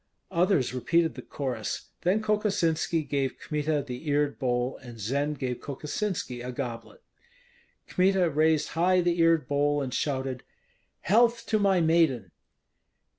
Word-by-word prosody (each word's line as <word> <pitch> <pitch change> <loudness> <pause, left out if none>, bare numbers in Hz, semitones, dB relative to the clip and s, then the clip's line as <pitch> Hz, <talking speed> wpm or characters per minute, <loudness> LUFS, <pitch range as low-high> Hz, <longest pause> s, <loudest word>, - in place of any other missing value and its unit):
Others 170 -8 +2
repeated 160 +6 +1
the - - -8
chorus; 130 -6 -4
then 195 +5 +1
Kokosinski 190 -7 +1
gave 135 -1 -1
Kmita 150 -1 -1
the 125 +3 -7
eared 145 0 +1
bowl, 125 0 -1
and 120 -3 -12
Zend 140 +8 -1
gave 125 -2 -3
Kokosinski 145 - -4
a 125 +1 -5
goblet. 125 - -6 0.8
Kmita 185 -1 +2
raised 155 +1 +2
high 180 +3 +2
the 175 0 0
eared 165 -4 +3
bowl 145 0 +1
and 130 -3 -3
shouted, 130 -3 -2 0.6
"Health 235 +4 +3
to 215 - +2
my 195 -3 +3
maiden!" 160 - +2
150 Hz, 130 wpm, -27 LUFS, 130-175 Hz, 0.8 s, eared